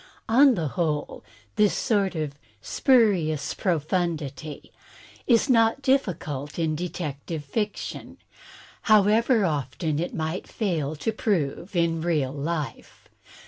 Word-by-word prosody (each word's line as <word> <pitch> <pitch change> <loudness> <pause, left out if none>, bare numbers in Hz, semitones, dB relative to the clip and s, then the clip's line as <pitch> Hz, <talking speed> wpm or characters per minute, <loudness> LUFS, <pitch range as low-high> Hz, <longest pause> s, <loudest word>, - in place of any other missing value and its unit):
On 260 +3 +6
the 160 -6 -2
whole 155 -1 -2 0.3
this 210 -1 +4
sort 200 -4 +1
of 155 -3 -3 0.3
"spurious 190 - +2
profundity 160 -4 -2 0.3
" - - -20 0.2
is 235 +1 +4
not 230 +1 +3
diflScult 155 - -1
in 160 -2 0
detective 155 -2 -5
fiction, 210 +8 -4 0.7
however 215 +2 +4
often 150 0 -2
it 175 - -3
might 160 +3 -3
fail 160 - -2
to 155 +9 -2
prove 185 -4 -2
in 165 -1 +1
real 155 -6 0
life. 150 +1 -5
170 Hz, 110 wpm, -25 LUFS, 150-210 Hz, 0.7 s, On